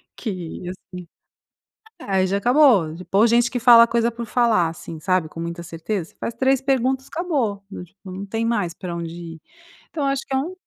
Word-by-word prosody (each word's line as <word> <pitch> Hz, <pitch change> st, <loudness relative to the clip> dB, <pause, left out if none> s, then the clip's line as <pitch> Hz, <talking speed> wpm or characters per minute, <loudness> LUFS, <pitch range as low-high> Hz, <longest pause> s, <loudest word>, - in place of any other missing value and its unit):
que, 185 Hz, -8 st, -6 dB
assim 180 Hz, -1 st, -10 dB, 0.9 s
é, 190 Hz, -1 st, 0 dB
já 195 Hz, +2 st, 0 dB
acabou, 240 Hz, -, +4 dB
p 180 Hz, +2 st, -10 dB
ou 215 Hz, -, +6 dB
gente 235 Hz, +1 st, +3 dB
que 245 Hz, -, -2 dB
fala 235 Hz, 0 st, +8 dB
coisa 235 Hz, 0 st, +1 dB
por 235 Hz, 0 st, -6 dB
falar, 230 Hz, -6 st, +2 dB
assim, 165 Hz, 0 st, -9 dB
sabe, 185 Hz, -1 st, 0 dB
com 165 Hz, -, -10 dB
muita 170 Hz, +1 st, -5 dB
certeza? 170 Hz, +2 st, -5 dB
Faz 235 Hz, -, -3 dB
3 265 Hz, +1 st, +2 dB
perguntas, 265 Hz, 0 st, 0 dB
acabou, 280 Hz, -, -2 dB
n 185 Hz, -, -7 dB, 0.2 s
não 190 Hz, +1 st, -6 dB
tem 225 Hz, +3 st, -3 dB
mais 205 Hz, -7 st, 0 dB
pra 175 Hz, -2 st, -6 dB
onde 165 Hz, -1 st, -5 dB, 0.2 s
ir. 160 Hz, -, -17 dB, 0.5 s
Então 300 Hz, -3 st, -4 dB
eu 275 Hz, -, +2 dB
acho 275 Hz, -1 st, -2 dB
que 270 Hz, -, -6 dB
é -, -, +3 dB
um 325 Hz, +8 st, -3 dB
215 Hz, 195 wpm, -22 LUFS, 180-250 Hz, 0.9 s, fala